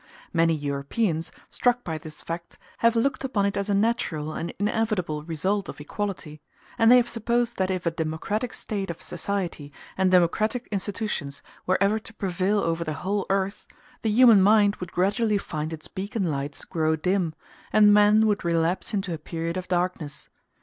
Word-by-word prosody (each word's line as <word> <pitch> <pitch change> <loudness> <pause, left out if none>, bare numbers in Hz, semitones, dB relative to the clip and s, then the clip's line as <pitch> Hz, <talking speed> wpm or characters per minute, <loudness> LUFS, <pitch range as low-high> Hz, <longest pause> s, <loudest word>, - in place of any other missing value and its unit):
Many 165 -1 +3
Europeans, 155 +5 -1 0.2
struck 245 0 +2
by 160 -2 -4
this 155 0 -9
fact, 170 +1 -6 0.2
have 230 0 +4
looked 260 +4 +1
upon 230 -7 0
it 200 - 0
as 200 +1 -2
a 200 - +2
natural 180 -8 0
and 170 +2 -4
inevitable 205 -7 -1
result 175 +6 -1
of - - -8
equality; 155 -2 -5 0.4
and 225 +1 +6
they 250 - +9
have 240 -1 +3
supposed 235 +1 0
that 190 0 +1
if 185 -2 -2
a 170 - +2
democratic 165 +9 -2
state 200 -3 -4
of 170 - -5
society 180 -7 -3 0.2
and 190 -1 +2
democratic 215 +7 +2
institutions 195 -9 -3 0.2
were 185 - +3
ever 200 +3 +2
to 225 +1 -11
prevail 195 +1 0
over 165 0 0
the 155 -2 -3
whole 200 +1 0
earth, 195 +1 -1 0.3
the 220 - 0
human 225 -2 +7
mind 205 +1 +5
would 180 -1 -7
gradually 205 +4 +1
find 155 -5 -4
its 160 -1 -7
beacon 195 -2 -3
lights 140 0 -4
grow 160 -2 +1
dim, 175 0 0 0.4
and 210 -1 +6
men 210 +1 +6
would 210 -1 +1
relapse 170 +4 0
into 195 -3 -2
a 160 - -5
period 165 +2 -4
of 185 0 -4
darkness. 175 -4 -2
190 Hz, 175 wpm, -25 LUFS, 165-210 Hz, 0.4 s, they